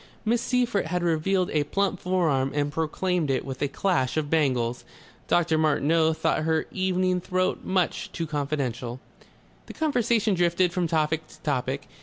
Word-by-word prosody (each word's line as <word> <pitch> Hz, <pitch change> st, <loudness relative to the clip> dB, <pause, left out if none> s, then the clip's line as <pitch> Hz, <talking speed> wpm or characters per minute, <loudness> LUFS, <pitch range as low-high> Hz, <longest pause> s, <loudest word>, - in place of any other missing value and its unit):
Miss 235 Hz, +2 st, +2 dB
Seyffert 245 Hz, -5 st, 0 dB
had 180 Hz, -1 st, -1 dB
revealed 175 Hz, +3 st, +1 dB
a 150 Hz, -1 st, +2 dB
plump 195 Hz, +3 st, 0 dB
forearm 160 Hz, -8 st, +1 dB
and 145 Hz, 0 st, 0 dB
proclaimed 160 Hz, +1 st, -1 dB
it 135 Hz, -, 0 dB
with 135 Hz, -1 st, -6 dB
a 145 Hz, -, +2 dB
clash 140 Hz, -3 st, 0 dB
of 150 Hz, -2 st, -1 dB
bangles. 125 Hz, -7 st, +1 dB, 0.4 s
Dr. 165 Hz, -2 st, +2 dB
Martineau 160 Hz, +1 st, +3 dB
thought 155 Hz, -, 0 dB
her 160 Hz, 0 st, +1 dB
evening 185 Hz, -1 st, 0 dB
throat 185 Hz, +1 st, -1 dB
much 185 Hz, -2 st, -1 dB
too 165 Hz, -, -3 dB
confidential. 135 Hz, -5 st, -3 dB, 0.7 s
The -, -, -8 dB
conversation 235 Hz, -8 st, +1 dB
drifted 175 Hz, 0 st, +2 dB
from 180 Hz, -2 st, 0 dB
topic 160 Hz, 0 st, 0 dB
to -, -, -17 dB
topic. 135 Hz, -2 st, -2 dB
160 Hz, 155 wpm, -26 LUFS, 145-185 Hz, 0.7 s, Martineau